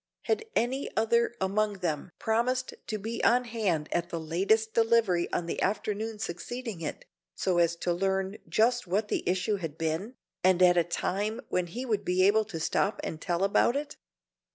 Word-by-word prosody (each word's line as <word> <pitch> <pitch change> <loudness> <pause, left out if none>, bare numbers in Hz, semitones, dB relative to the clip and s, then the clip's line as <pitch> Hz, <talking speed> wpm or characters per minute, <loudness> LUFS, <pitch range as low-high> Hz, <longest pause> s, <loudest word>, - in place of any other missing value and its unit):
Had 445 0 0
any 260 +4 0
other 235 +2 +2
among 205 +2 +1
them 175 -5 -3
promised 250 +3 0
to 215 - -2
be 225 +3 -4
on 245 +1 +4
hand 205 -10 -1
at 175 0 -1
the 170 - -3
latest 195 +8 +1
delivery 225 -6 +3
on 175 - -1
the 170 - -3
afternoon 215 +2 -1
succeeding 215 +2 -5
it, 155 - -5 0.3
so 180 -2 +1
as 170 0 +3
to 175 +1 -1
learn 190 +2 -1
just 240 0 +2
what 205 +4 0
the - - 0
issue 190 +3 +1
had 160 -5 -6
been, 165 +10 -2 0.3
and 185 0 +5
at 175 -1 +6
a 175 - +4
time 200 +6 -2
when 180 -1 0
he 245 +9 -5
would 215 -4 0
be 185 0 +3
able 215 +2 +4
to 190 -6 -6
stop 195 +5 0
and 160 - -5
tell 175 0 0
about 200 +5 +3
it? 290 +1 -3
200 Hz, 180 wpm, -29 LUFS, 175-225 Hz, 0.3 s, at